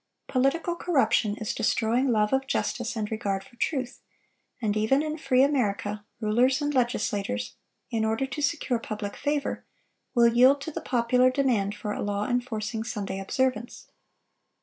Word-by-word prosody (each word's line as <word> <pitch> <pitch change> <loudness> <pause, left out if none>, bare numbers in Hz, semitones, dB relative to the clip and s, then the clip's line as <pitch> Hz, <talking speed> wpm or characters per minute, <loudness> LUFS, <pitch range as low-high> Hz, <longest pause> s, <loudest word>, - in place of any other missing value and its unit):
Political 290 +7 +1
corruption 230 -11 +2
is 215 - -3
destroying 230 +3 +1
love 215 -3 +2
of 265 0 +1
justice 240 -3 -1
and 215 -1 -3
regard 200 -3 -2
for 215 - -19
truth; 260 -1 -2 0.6
and 215 -3 0
even 220 +7 +2
in 310 0 -2
free 270 -4 +3
America, 210 -7 0 0.2
rulers 245 +5 +2
and 290 -1 -1
legislators, 205 - -1 0.4
in 225 -2 0
order 220 +5 0
to 270 +3 -5
secure 280 -4 0
public 210 -2 -5
favor, 290 -1 -2 0.5
will 235 -1 +6
yield 255 +4 +5
to 320 - -5
the - - -5
popular 250 +1 +3
demand 245 -7 +1
for 210 0 -4
a - - -4
law 205 0 -1
enforcing 230 -3 -2
Sunday 200 -4 -4
observance. 240 +3 -2
240 Hz, 150 wpm, -27 LUFS, 215-265 Hz, 0.6 s, will